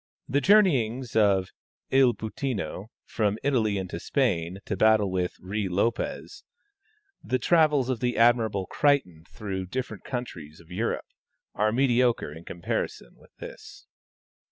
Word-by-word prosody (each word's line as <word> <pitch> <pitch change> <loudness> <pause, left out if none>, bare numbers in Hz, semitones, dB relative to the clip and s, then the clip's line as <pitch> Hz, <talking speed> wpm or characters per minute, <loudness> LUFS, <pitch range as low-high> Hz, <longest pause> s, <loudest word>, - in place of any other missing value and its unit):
The 140 +3 +1
journeyings 135 - +3
of 100 -4 +3 0.4
Il 130 -3 +4
Puttino 110 -3 -4 0.2
from 105 -2 -1
Italy 115 -7 +1
into 90 -3 -4
Spain 90 - 0
to 100 - -2
battle 110 -1 +3
with 90 -1 -2
Ruy 100 +1 -3
Lopez 115 +6 -2 0.8
the 130 - 0
travels 150 -1 +3
of 130 -3 -1
the 125 -1 -1
admirable 115 -5 +3
Crichton 110 - +1
through 95 -3 -5
different 115 -3 -5
countries 85 - -6
of 85 +1 -18
Europe, 110 +6 -2 0.5
are 105 +1 +1
mediocre 125 - +2
in 80 +2 -12
comparison 85 -7 -4
with - - -23
this. - - -11
110 Hz, 130 wpm, -26 LUFS, 95-130 Hz, 0.8 s, Il